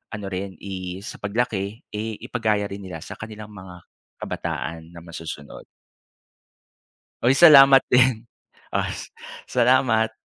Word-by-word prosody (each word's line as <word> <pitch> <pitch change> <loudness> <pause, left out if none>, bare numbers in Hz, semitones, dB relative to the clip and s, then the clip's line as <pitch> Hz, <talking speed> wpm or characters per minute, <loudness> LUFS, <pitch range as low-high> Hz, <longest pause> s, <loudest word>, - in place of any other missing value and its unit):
ano 105 -2 -7
rin 95 0 -5
i 95 -1 -6
sa - - -8
paglaki, 105 0 -2
eh 110 +1 -4
ipagaya 110 -4 0
rin 100 - -6
nila 90 -5 -8
sa - - -10
kanilang 110 -1 -9
mga 95 -3 -12 0.3
kabataan 80 0 -5
na 85 - -11
masusunod. 80 -4 -9 1.6
Uy 125 +3 +4
salamat 135 -5 +9
din. 125 -2 +4 0.5
Os - - -3 0.3
Salamat! 120 -3 +2
105 Hz, 115 wpm, -23 LUFS, 95-120 Hz, 1.6 s, salamat